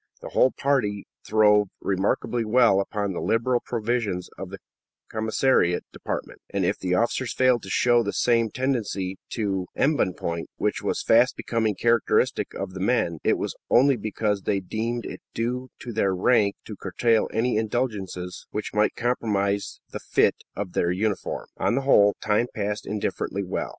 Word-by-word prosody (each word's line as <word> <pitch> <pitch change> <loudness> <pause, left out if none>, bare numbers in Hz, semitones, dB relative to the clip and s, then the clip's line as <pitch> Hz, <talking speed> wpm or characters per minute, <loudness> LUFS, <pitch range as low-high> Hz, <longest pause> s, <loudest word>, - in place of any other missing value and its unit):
The - - -8
whole 130 - +4
party 125 -9 0 0.2
throve 105 -1 +4
remarkably 100 +5 0
well 115 -2 +4
upon 100 0 -2
the - - -4
liberal 120 +2 +1
provisions 110 -6 -2
of - - -7
the - - -7 0.5
commissariat 110 -4 +2
department, - - -5
and - - -1
if - - 0
the 90 -1 0
officers 120 +4 0
failed 130 -2 +3
to 95 - -9
show 120 +4 +4
the 100 -3 -2
same 115 -2 +2
tendency 105 -7 -2 0.2
to 95 -5 -1
embonpoint 90 - 0
which - - -1
was - - -1
fast 120 +3 +4
becoming 110 -3 0
characteristic 115 +1 +2
of 95 -1 -5
the 95 - -7
men, 95 -6 +1
it - - +3
was - - -3
only 135 +3 +5
because 105 -2 -1
they 100 +1 0
deemed 115 +5 -3
it - - -7
due 125 +3 -2
to 120 - -6
their 100 -3 +1
rank 100 +1 +3
to - - -7
curtail 115 -2 +1
any 115 +1 +1
indulgences 105 -6 -3
which 105 - -4
might 105 0 +2
compromise 100 -5 -1
the - - -5
fit - - +2 0.2
of 100 -3 -4
their 85 - +1
uniform. 100 +3 -2
On - - +1
the 135 - +1
whole, 105 -7 +5
time 110 +3 +2
passed 105 -1 -3
indifferently 100 -1 -2
well. 90 - -3
110 Hz, 160 wpm, -25 LUFS, 100-120 Hz, 0.5 s, only